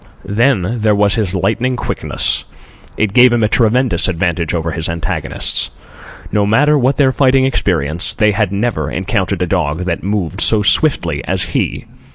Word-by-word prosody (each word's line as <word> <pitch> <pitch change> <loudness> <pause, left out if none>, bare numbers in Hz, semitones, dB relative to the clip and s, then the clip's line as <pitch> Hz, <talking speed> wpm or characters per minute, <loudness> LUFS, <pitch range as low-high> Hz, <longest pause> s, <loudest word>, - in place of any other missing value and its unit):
Then 115 +1 0
there 105 -1 +2
was 100 0 +2
his 100 -4 -1
lightning 125 +7 0
quickness. - - -1 0.5
It 105 -2 0
gave 125 +1 +6
him 120 -2 +1
a - - +3
tremendous 115 -4 +2
advantage 85 -2 -1
over 85 0 -2
his 80 +1 -3
antagonists. 85 0 -2 0.6
No 105 - +1
matter 145 +8 +3
what 135 -1 +1
their 135 -3 +3
fighting 130 0 +3
experience, 85 - 0
they 105 -1 +2
had 105 -2 -1
never 100 -8 -2
encountered 95 +1 -2
a - - +1
dog 85 -3 -1
that 90 -2 -3
moved 95 -2 -2
so 110 -2 +2
swiftly 85 - +1
as - - -1
he. - - -2
105 Hz, 165 wpm, -15 LUFS, 85-120 Hz, 0.6 s, gave